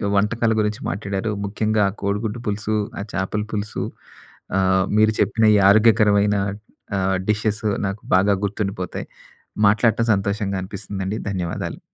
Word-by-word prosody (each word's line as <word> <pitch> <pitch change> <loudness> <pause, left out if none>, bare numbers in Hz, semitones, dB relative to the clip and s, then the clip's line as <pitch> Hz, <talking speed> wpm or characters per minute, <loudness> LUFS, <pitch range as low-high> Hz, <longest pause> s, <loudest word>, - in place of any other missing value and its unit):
వంటకాల 110 +3 +2
గురించి 105 0 -1
మాట్లాడారు. 100 +2 -3
ముఖ్యంగా 105 +1 0 0.2
కోడిగుడ్డు 105 +3 -2
పులుసు, 105 +1 -1 0.2
ఆ - - -3
చేపల 95 +2 -1
పులుసు 105 0 -3 0.7
ఆహ్, 95 0 +3
మీరు 110 0 +5
చెప్పిన 110 -1 +2
ఈ - - +5
ఆరోగ్యకరమైన 105 -1 +4 0.6
ఆహ్, 95 0 +1
డిషెస్. 105 0 0 0.2
నాకు 95 +2 -5
బాగా 100 +2 +4
గుర్తుండిపోతాయి. 100 -3 -3 0.6
మాట్లాట 110 +2 +3
సంతోషంగా 100 0 -1
అనిపిస్తుందండి. 95 0 -5
ధన్యవాదాలు. 90 -4 -4
105 Hz, 115 wpm, -22 LUFS, 95-110 Hz, 0.7 s, మీరు